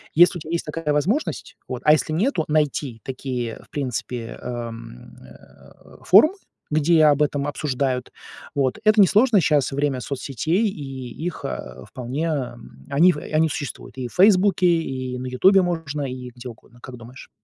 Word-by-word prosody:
Если 175 +2 +5
у - - -14
тебя 155 - -8
есть 170 - -2
такая 150 0 -3
возможность, 195 - -1
вот - - -5
а 150 - +7
если 155 0 0
нету, 180 - 0
найти 150 -5 -1
такие, 125 -3 -4
в - - -24
принципе, 125 -3 -4
эм, 115 - -8
э, 65 - -18
форумы, 225 - +6 0.4
где 155 +1 +4
об 150 -1 +4
этом 145 -1 -1
обсуждают. 135 -3 -2 0.4
Вот, 135 -3 0
это 215 0 +4
несложно 210 +4 +5
щас 150 -4 +2
время 140 -2 -1
соцсетей, 145 - -1
и 135 -5 -8
их, 175 - -5
э, 65 0 -6
вполне, 130 +6 -4
э, 140 -7 -3 0.3
они 165 +6 +5
в 150 - -6
они 155 +2 +1
существуют 145 -2 -6
и 130 -2 -4
в - - -18
"Фейсбуке", 190 -1 +4
и 130 -7 -1
на 130 - -5
"Ютубе" 190 +10 +4
можно, 165 -5 -3
и 125 -1 -7
где 125 +1 -8
угодно. 120 +1 -16
Как 130 0 -10
думаешь? 120 +2 -13
145 Hz, 165 wpm, -22 LUFS, 125-165 Hz, 0.4 s, а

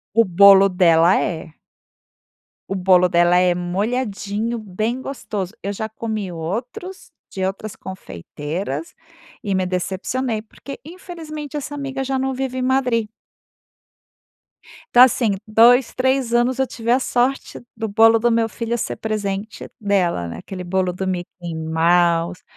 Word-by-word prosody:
O 230 - +6
bolo 195 +1 +7
dela 175 -1 +4
é. 160 -4 -4 1.2
O 195 - -2
bolo 180 -1 +4
dela 175 +1 +4
é 180 0 +4
molhadinho, 205 +4 -2
bem 215 +4 -3
gostoso. 210 -9 -5
Eu 200 +1 -3
já 220 +2 -4
comi 215 -3 -4
outros, 230 - -6 0.2
de 190 - -5
outras 195 +2 -5
confeiteiras, 155 - -6 0.5
e 200 -2 -1
me 185 0 0
decepcionei, 200 +6 -2
porque 250 +5 -11
infelizmente 315 -4 -8
essa 290 0 -5
amiga 275 -1 -4
já 265 0 -1
não 265 0 -1
vive 260 0 -3
em - - -2
Madrid. 250 -4 +1 1.9
Tá 245 - +10
assim, 230 -5 +2
2, 235 +4 +5
3 260 -2 +1
anos 240 +2 +2
eu 265 - +2
tive 235 -1 -3
a 250 - +4
sorte 255 +1 -1 0.2
do 225 0 -2
bolo 225 +2 +5
do 240 +2 +2
meu 230 -1 +1
filho 235 +1 -3
ser - - -4
presente 210 -1 -4
dela, 190 - 0
né, 85 - -7
aquele 185 -2 -8
bolo 185 0 0
do 190 +2 -4
Mickey 175 -2 -5
Mouse, 170 +2 +1
210 Hz, 140 wpm, -20 LUFS, 180-245 Hz, 1.9 s, Tá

